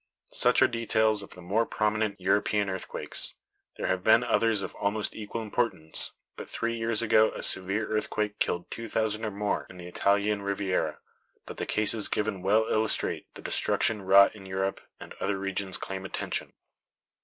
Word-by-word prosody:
Such - - +4
are - - +6
details 110 -2 +1
of 100 - -11
the 90 - -12
more 100 +6 +1
prominent 110 -2 -1
European 100 +1 +1
earthquakes. 95 - -3 0.4
There - - -3
have 95 -1 0
been 115 +2 +5
others 115 -4 +2
of - - -6
almost 105 +1 -1
equal 110 +1 -5
importance; 105 -8 0 0.2
but - - -9
three 115 0 -2
years 115 -1 +1
ago 110 -1 +5
a - - -6
severe 95 +3 +1
earthquake 105 -1 -2
killed 85 0 -1
two 115 -1 -6
thousand 110 0 -1
or - - -1
more 105 0 -2
in 90 - -12
the 90 - -9
Italian 100 +3 +1
Riviera; 95 -5 -1 0.5
but - - -9
the - - -4
cases 105 0 +4
given 105 -3 -2
well 105 +4 +3
illustrate 110 0 -1
the - - -10
destruction 110 -2 +2
wrought 100 +2 +6
in 95 -2 -11
Europe, 95 +1 -2 0.2
and - - -10
other 100 0 0
regions 100 0 -2
claim 95 -1 -6
attention. 95 - -3
105 Hz, 170 wpm, -28 LUFS, 95-110 Hz, 0.5 s, are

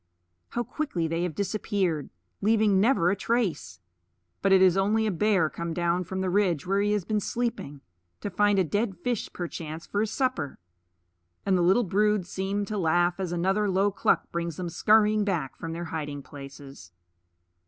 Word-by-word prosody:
How 240 - -2
quickly 225 - -2
they 165 +1 -2
have 175 -4 -2
disappeared, 195 -6 -1 0.3
leaving 215 -2 +3
never 200 -5 +3
a - - +1
trace! 185 - -1 0.6
But 195 - +2
it 190 - +7
is 185 -1 +5
only 210 +3 +2
a 215 - +1
bear 195 -2 +2
come 170 +1 -5
down 175 +1 0
from 190 +2 -4
the 190 - 0
ridge 180 -6 +1
where 195 +2 +1
he 205 0 +1
has 205 -4 -1
been 215 -1 0
sleeping, 220 - -3 0.4
to 205 - -4
find 205 +2 +3
a 190 - +4
dead 205 +3 -1
fish 235 +5 -3
perchance 165 -2 -6
for 205 - -1
his 220 - 0
supper; 255 - -1 0.9
and 195 -1 +3
the 180 - +2
little 190 +8 +4
brood 210 0 +1
seem 195 +3 -2
to 210 +1 -3
laugh 175 +1 +2
as 185 -3 -2
another 190 +4 +1
low 195 +2 +2
cluck 195 - +1
brings 170 -2 -3
them 180 -2 -3
scurrying 210 +4 +3
back 170 -10 -2
from 165 - -6
their 170 +1 -4
hiding 150 -3 -5
places. 135 -9 -11
190 Hz, 180 wpm, -27 LUFS, 170-210 Hz, 0.9 s, it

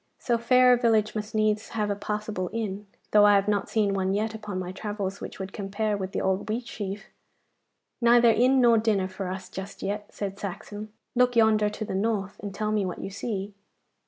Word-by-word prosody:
So 235 -2 0
fair 250 +1 +5
a - - +4
village 220 -3 +2
must 215 0 -5
needs 215 0 +1
have 210 -1 0
a - - 0
passable 210 -3 -3
inn, 210 -3 -4 0.2
though 210 -1 +6
I 205 - +6
have 200 0 +2
not 205 -2 0
seen 210 -3 +1
one 190 0 0
yet 215 +2 -1
upon 210 -3 -6
my 180 -1 -4
travels 200 0 -4
which - - -7
would 190 0 -6
compare 205 +1 -2
with 190 -1 -4
the - - -2
old 190 0 0
Wheatsheaf.' 210 -3 -4 1.0
'Neither 235 0 +6
inn 255 +4 +4
nor 235 -2 +5
dinner 210 -4 +1
for 190 0 -5
us 185 0 -5
just 190 +1 -8
yet,' 205 +1 -3
said 200 -1 -5
Saxon. 205 +2 -6 0.2
'Look 250 -1 +3
yonder 215 -2 +4
to 210 +1 -5
the - - -5
north, 200 0 -1
and 205 - -5
tell 215 +2 -2
me 210 -1 +1
what 185 -2 -3
you 195 - -5
see. 200 -1 -4
210 Hz, 205 wpm, -26 LUFS, 195-220 Hz, 1.0 s, though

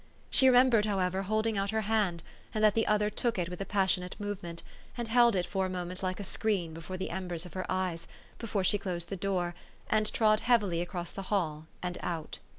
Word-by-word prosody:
She 265 - +6
remembered, 250 -4 +6
however, 190 -2 0
hold 215 +3 0
ing 220 -3 +1
out 195 0 -1
her 220 +1 0
hand, 205 -6 0 0.3
and 215 - +1
that 215 -1 +6
the 225 - +1
other 210 0 +2
took 230 +1 -1
it 175 -1 -1
with 180 +1 -6
a 195 - -4
passionate 190 -2 +1
movement, 195 -5 -5 0.3
and 240 -1 -2
held 235 -1 +5
it 180 -1 +1
for 190 -1 -1
a - - -6
moment 180 0 -4
like 185 0 -2
a - - -4
screen 190 -4 -1
before 165 +3 -6
the 190 - -4
embers 175 -1 -3
of 180 - -11
her 185 - -4
eyes, 185 -3 -2 0.3
before 210 -4 -1
she 205 +2 +3
closed 175 -3 -2
the 195 - -3
door, 180 -2 -1 0.4
and 215 0 +2
trod 215 -1 +4
heavity 210 -9 +2
across 175 -1 -4
the 195 - -6
hall 160 -6 -1 0.2
and 180 -1 -3
out. 165 -3 -4
190 Hz, 220 wpm, -30 LUFS, 180-215 Hz, 0.4 s, She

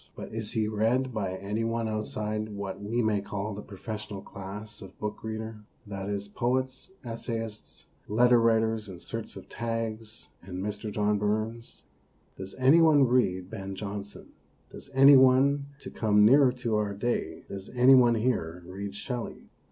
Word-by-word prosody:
But - - -8
is 110 -1 -4
he 110 -3 +1
read 115 +5 +1
by 100 -4 -2
any 105 +4 -3
one 115 0 -1
outside 110 0 -3
what 100 -1 -6
we 115 +4 -1
may 105 -2 +1
call 105 +1 -4
the 100 - -6
profes 105 +1 -7
sional 100 -2 -8
class 105 +3 -8
of 95 -1 -12
book 105 0 -5
reader 110 0 -5 0.3
that 100 -1 -5
is, 100 0 -3
poets, 130 - -2
essayists, 115 -2 -6 0.2
leader 120 +2 +5
writers 110 -2 +2
in 90 -2 -9
search 115 +4 -6
of - - -10
tags, 115 -1 -4
and 90 0 -8
Mr. 105 +3 -4
John 105 0 +1
Burns? 110 +3 -3 0.5
Does 95 0 -8
any 135 +6 +5
one 155 -4 +6
read 95 -8 +1
Ben 95 -3 -6
Jonson? 100 0 -7 0.4
Does - - -11
any 135 +1 +9
one, 135 +2 +5
to - - -8
come 105 -2 +3
nearer 135 +3 +6
to 120 -4 -1
our 105 -1 -1
day 120 +4 -2
does 95 0 -8
any 125 +2 +7
one 120 -3 +6
here 90 -8 -1
read 100 +2 -6
Shelley? 120 +3 -6
110 Hz, 165 wpm, -28 LUFS, 100-120 Hz, 0.5 s, any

